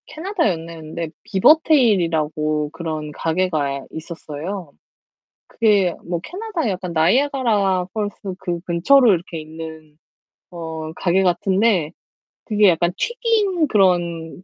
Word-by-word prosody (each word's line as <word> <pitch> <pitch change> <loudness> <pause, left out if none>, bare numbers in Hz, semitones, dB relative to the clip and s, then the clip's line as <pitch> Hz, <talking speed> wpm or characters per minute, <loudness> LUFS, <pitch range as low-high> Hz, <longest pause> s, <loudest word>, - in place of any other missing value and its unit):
캐나다 350 - -1
였는데 165 -1 -5
BeaverTails이라고 170 - +3
그런 155 -2 -5
가게가 155 -5 -1
있었어요. 165 +2 -7 0.8
그게 205 -6 +2
뭐 170 -1 -3
캐나다에 365 - -3
약간 180 -2 -4
나이아가라 200 - +2
펄스 205 -3 -4
그 175 -3 -3
근처로 210 +9 +4
이렇게 170 -2 -3
있는 160 -1 -10 0.5
어 160 -2 -6
가게 185 +1 +2
같은데 190 -1 +2 0.6
그게 210 -2 +4
약간 175 0 +2
튀긴 435 -8 +1
그런 175 - +1
180 Hz, 285 characters per minute, -20 LUFS, 160-215 Hz, 0.8 s, 근처로